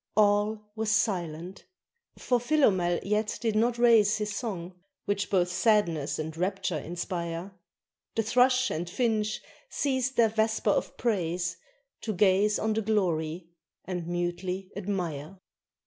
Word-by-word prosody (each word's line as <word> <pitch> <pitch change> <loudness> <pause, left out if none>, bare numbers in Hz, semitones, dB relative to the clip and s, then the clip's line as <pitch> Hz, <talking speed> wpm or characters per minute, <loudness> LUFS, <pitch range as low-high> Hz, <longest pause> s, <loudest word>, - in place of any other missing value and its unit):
All 210 0 +2
was 220 -1 -1
silent; 180 -4 -1 0.5
for 245 -1 +1
Philomel 205 - +2
yet 210 +1 0
did 225 -2 -1
not 235 +2 +2
raise 225 -3 +5
His 210 -1 -3
song, 190 -8 -4 0.3
which 205 0 -1
both 180 -3 +2
sadness 175 -9 +2
and 160 0 -4
rapture 185 -1 -1
inspire: 170 +2 -4 0.6
The 225 - +1
thrush 255 +3 +3
and 170 +2 -3
finch 215 0 0 0.3
ceased 265 -1 -1
their 230 -2 +5
vesper 220 -1 +1
of - - -1
praise 175 -6 -1 0.4
To 220 - -2
gaze 200 +2 +3
on 220 0 0
the 220 - 0
glory: 170 -6 -1 0.4
and 180 -3 -4
mutely 175 +2 -3
admire. 180 -4 -4
200 Hz, 130 wpm, -28 LUFS, 175-220 Hz, 0.6 s, raise